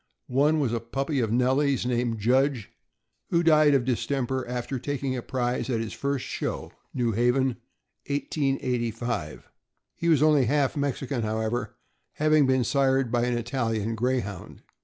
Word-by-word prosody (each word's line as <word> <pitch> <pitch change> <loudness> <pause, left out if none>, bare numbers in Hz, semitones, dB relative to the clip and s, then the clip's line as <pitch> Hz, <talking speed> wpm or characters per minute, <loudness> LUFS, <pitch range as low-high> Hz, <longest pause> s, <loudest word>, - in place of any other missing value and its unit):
One 145 +5 +2
was 130 -6 0
a 115 - 0
puppy 135 +5 -2
of 115 -3 0
Nellie's, 130 +3 +2
named 120 -2 0
Judge, 125 +2 +1 0.6
who 170 0 +2
died 155 -3 +5
of 125 -3 +1
distemper 130 +1 -1
after 125 +1 -3
taking 140 0 -2
a 125 - -3
prize 125 -1 -2
at 115 -3 0
his 115 -1 -4
first 140 -1 -2
show, - - -4 0.2
New 120 -2 0
Haven, 125 +3 +1 0.5
1885. 120 - -2 0.5
He 170 - -1
was 155 -3 +4
only 150 -4 +4
half 140 +2 +1
Mexican, 140 -2 -2
however, 110 +2 -2 0.4
having 155 -2 +3
been 130 -1 +3
sired 135 -1 +1
by 120 0 +2
an 120 -1 0
Italian 115 -3 -2
Greyhound. 110 -6 -3
125 Hz, 145 wpm, -26 LUFS, 120-140 Hz, 0.6 s, died